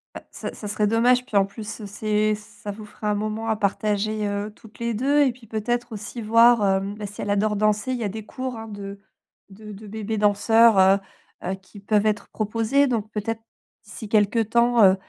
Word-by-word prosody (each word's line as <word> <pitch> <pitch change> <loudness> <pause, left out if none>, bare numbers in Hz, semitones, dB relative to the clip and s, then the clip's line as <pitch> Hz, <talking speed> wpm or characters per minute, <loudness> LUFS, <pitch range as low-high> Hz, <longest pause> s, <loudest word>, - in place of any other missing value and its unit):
Bah, - - -8
ça - - -6
ça 210 - -8
serait 210 0 0
dommage, 245 +3 +3
puis 225 - -8
en 195 - +5
plus 210 +2 -8
c'est 215 +1 0
ça 210 0 -9
vous 210 +1 -9
fera 210 0 -5
un - - +1
moment 215 +2 -3
à 220 - +2
partager, 210 +1 0
heu, 205 +1 -3
toutes 220 -1 -17
les 235 0 -1
2 275 +6 +2
et 260 - +2
puis 235 -1 -17
peut-être 240 +3 -2
aussi 215 +2 -6
voir, 230 +1 +5
hem, 195 +1 0
bah, 210 0 -6
si 205 +1 -8
elle 205 - -4
adore 210 +1 +1
danser, 215 +4 +1
il 255 - -1
y 235 - -4
a 205 - -1
des 215 +1 -7
cours 255 0 -5
hein, 225 0 -7
de 200 -1 -8 0.5
de 210 +2 -11
de 210 +1 -10
bébés 220 +1 -4
danseurs, 215 +2 +4
heu, 190 +1 +6 0.5
heu, 185 +2 -2
qui 190 +2 -15
peuvent 205 +1 +1
être 210 -1 0
proposés, 225 +6 +1
donc 220 -4 -2
peut-être 220 +2 -3 0.4
d'ici 215 0 -9
quelque 215 +1 +3
temps, 235 +2 +3
heu, 190 -1 +7
215 Hz, 215 wpm, -24 LUFS, 205-225 Hz, 0.5 s, heu